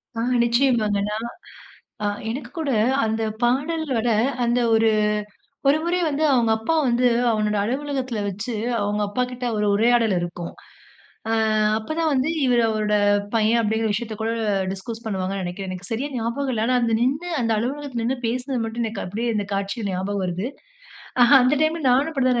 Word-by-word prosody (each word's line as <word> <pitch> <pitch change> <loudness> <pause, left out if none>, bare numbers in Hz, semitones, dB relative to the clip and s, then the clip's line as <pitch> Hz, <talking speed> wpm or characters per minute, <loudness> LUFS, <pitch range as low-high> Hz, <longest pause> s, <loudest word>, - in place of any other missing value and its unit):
ஆ - - -3 0.2
நிச்சயமாங்கண்ணா! 220 -5 +1 0.9
அ - - +1 0.2
எனக்கு 260 +5 -5
கூட 310 -4 -2 0.4
அந்த 220 +1 -1 0.2
பாடலோட 265 -1 0 0.3
அந்த 240 +1 +2
ஒரு 225 0 +4 0.8
ஒரு 295 +2 +5
முறை 355 +1 +1
வந்து 300 +2 0
அவுங்க 235 -3 +3
அப்பா 225 +9 -1
வந்து 245 +1 +2 0.3
அவனோட 210 -1 0
அலுவலகத்தில 260 -1 -2
வச்சு 205 +5 -4 0.3
அவுங்க 205 +1 -1
அப்பாக்கிட்ட 250 +3 -3
ஒரு 210 0 +1
உரையாடல் 230 -1 +3
இருக்கும். 175 0 -5 0.8
அ - - +1 0.5
அப்ப 220 - -11
தான் 320 -2 +2
வந்து 265 +3 +1 0.2
இவரு 245 -2 +3
அவரோட 215 -1 0 0.4
பையன் 225 +1 +3
அப்பிடிங்கிற 220 0 0
விஷயத்த 220 +1 -3
கூட 225 - 0 0.4
டிஸ்கஸ் 225 +4 -7
பண்ணுவாங்கன்னு 190 -1 -2
நினைக்கிறேன். 185 +2 -5
எனக்கு 185 +3 -8
சரியா 245 +6 -2
ஞாபகம் 235 +4 -2
இல்ல. 215 - -1
ஆனா, 255 0 +2
அந்த 230 -1 +2
நின்னு 280 +8 0
அந்த 230 -1 0
அலுவலகத்தில 260 0 -3
நின்னு 255 +3 0
பேசினது 250 +1 -2
மட்டும் 225 +1 -3
எனக்கு 220 -2 -4
அப்பிடியே 225 +6 -3
இந்த 205 -1 0
காட்சி 200 +3 -3
ஞாபகம் 190 +2 -2
வருது. 180 +5 -2 0.7
அ - - +8 0.2
அந்த 255 +4 +3
டைம்ல 315 0 0
நானும் 275 +6 +3
அப்பிடிதான் 255 -4 +2
230 Hz, 160 wpm, -23 LUFS, 210-255 Hz, 0.9 s, அ